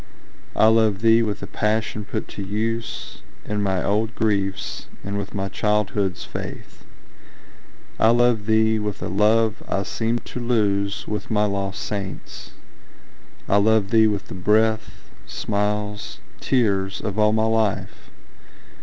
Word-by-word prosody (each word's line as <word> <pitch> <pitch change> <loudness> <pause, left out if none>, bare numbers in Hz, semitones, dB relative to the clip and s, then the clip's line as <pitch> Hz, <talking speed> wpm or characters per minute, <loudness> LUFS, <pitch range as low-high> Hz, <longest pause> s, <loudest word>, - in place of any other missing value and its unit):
I - - +5
love 110 -2 +4
thee 115 0 +6
with 105 -3 -2
the - - -4
passion 105 -1 -1
put - - -4
to - - -7
use 110 +4 -3 0.2
In 105 0 -2
my 95 -2 0
old 110 +3 0
griefs, 100 -3 -1 0.2
and 100 +1 -4
with 100 0 -4
my 95 -1 -1
childhood's 105 -2 0
faith. - - -8 1.2
I 110 - +5
love 120 -2 +3
thee 110 0 +3
with 105 -1 -4
a - - -2
love 110 +2 +2
I 100 - 0
seemed 115 +3 -2
to - - -6
lose 105 -4 0
With 105 - -4
my 105 -1 +2
lost 100 -1 -2
saints,—I 100 0 -6
love 105 -1 +3
thee 110 -1 +6
with 105 -2 -2
the - - -8
breath, 110 +4 0 0.2
Smiles, 105 0 -2 0.2
tears, 100 -7 +1
of 105 0 -3
all 105 0 +5
my 110 0 +2
life! 110 -3 -1
105 Hz, 135 wpm, -23 LUFS, 100-110 Hz, 1.2 s, thee